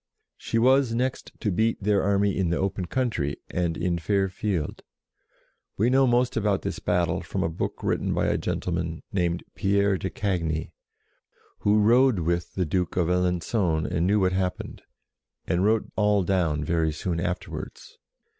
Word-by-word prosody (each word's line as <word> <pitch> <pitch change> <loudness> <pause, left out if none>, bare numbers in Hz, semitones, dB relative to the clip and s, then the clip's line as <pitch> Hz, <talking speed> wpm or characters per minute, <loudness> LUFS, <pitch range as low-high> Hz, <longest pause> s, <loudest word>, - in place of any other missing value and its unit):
She - - -3
was 130 0 +4
next 130 +2 -2
to 105 - 0
beat 110 +5 +1
their 100 -1 +2
army 100 0 +2
in 95 -3 0
the 85 - 0
open 95 -1 -2
country 110 - -1
and 85 -2 -1
in 85 -1 -1
fair 95 +2 +1
field. 90 -4 -3 1.0
We 115 +5 +2
know 135 0 +4
most 120 +1 +2
about 105 -3 +1
this - - -3
battle 90 -2 0
from - - -3
a - - 0
book 80 - -4
written - - 0
by - - +1
a - - +1
gentleman 85 -3 -3
named 85 -2 0
Pierre 100 -1 +1
de 95 - -3
Cagny, 85 -6 -2 0.9
who 105 +1 +3
rode 120 +2 +5
with 85 +1 -2
the 90 - 0
Duke 90 +2 -1
of 85 -2 +2
Alengon 90 -1 +1
and 90 -1 0
knew 105 +2 +3
what 95 -1 +3
happened, 95 -1 -3 0.6
and 90 +2 +1
wrote 110 +2 +1
all 105 -2 +3
down 85 -5 0
very 80 0 +1
soon 85 +2 -3
afterwards. 90 +1 -5
95 Hz, 165 wpm, -26 LUFS, 85-105 Hz, 1.0 s, rode